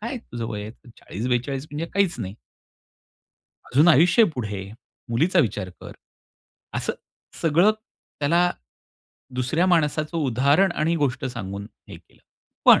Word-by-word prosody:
काय 235 +5 -4
तुझं 120 - -7
वय 105 -3 -4
आहे, 110 +4 -11
40-42 125 - -2
म्हणजे 150 +3 -4
काहीच 200 -3 +2
नाही." 95 +1 -5 1.3
अजून 150 +7 +4
आयुष्य 175 - +6
आहे 215 - +3
पुढे. 105 -7 -5 0.4
मुलीचा 165 +11 +2
विचार 105 - -1
कर. - - -9 0.8
असं - - -1 0.5
सगळं 170 +6 +5
त्याला 175 -5 -1 0.8
दुसऱ्या 130 +8 +1
माणसाचं 155 -2 +1
उदाहरण 145 +6 +3
आणि 160 +1 0
गोष्ट 140 -6 -1
सांगून 100 -6 -5 0.2
हे - - -9
केलं. - - -23 0.4
पण - - +8
145 Hz, 125 wpm, -24 LUFS, 120-170 Hz, 1.3 s, पण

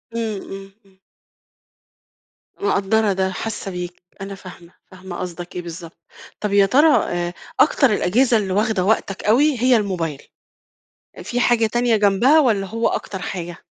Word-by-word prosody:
إمم. 220 -3 -3 0.4
إمم. 190 0 -27 1.6
مقدّرة 215 - +1
ده، 190 0 -1
حاسّة 210 -1 -5
بيك، 180 0 -7 0.2
أنا 195 0 -6
فاهمة، 180 -2 -13 0.2
فاهمة 185 -1 -9
قصدَك 175 0 -7
إيه 180 - -3
بالضبط. 170 -1 -9 0.4
طَب 210 -1 -2
يا 200 -1 +5
ترى 285 +10 +4 0.2
آآ، 175 0 -3 0.3
أكتر 270 -6 +4
الأجهزة 230 +5 +2
اللي 190 -3 -2
واخدة 210 -2 +1
وقتَك 200 -2 0
أوي 265 +6 +3
هي 250 -2 +4
الmobile، 165 -7 -4 1.0
في 245 - -3
حاجة 240 -2 +3
تانية 240 0 +1
جنبها 210 +9 +4
والّا 215 -8 +2
هو 230 +2 -1
أكتر 190 - -4
حاجة؟ 175 -2 -6
200 Hz, 140 wpm, -20 LUFS, 180-230 Hz, 1.6 s, يا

